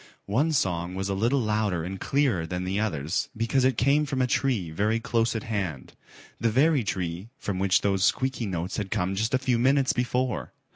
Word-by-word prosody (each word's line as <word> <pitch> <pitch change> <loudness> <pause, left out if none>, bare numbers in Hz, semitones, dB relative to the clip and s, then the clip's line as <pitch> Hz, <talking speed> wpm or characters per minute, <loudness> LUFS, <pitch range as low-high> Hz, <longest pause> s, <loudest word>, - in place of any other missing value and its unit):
One 135 +11 +1
song 90 - 0
was 95 +1 -2
a - - 0
little 120 +7 +1
louder 105 -6 0
and 95 +2 -5
clearer 130 - +1
than 90 +1 -3
the 95 +2 -1
others 80 -7 -1
because 115 +4 +1
it 130 0 +2
came 145 +4 +3
from 135 -1 -2
a 130 - +3
tree 120 - 0
very 105 +7 +1
close 115 0 0
at 110 - -2
hand, 95 - -4 0.5
the 115 - +2
very 135 +3 +3
tree 95 0 -3
from 95 -3 -3
which 95 0 +3
those 95 -2 +1
squeaky 130 -2 +1
notes 90 0 -3
had 105 -3 -3
come 90 +1 -1
just 110 +6 0
a - - +4
few 130 -2 0
minutes 135 +2 +3
before. 125 +1 -1
110 Hz, 200 wpm, -26 LUFS, 95-130 Hz, 0.5 s, a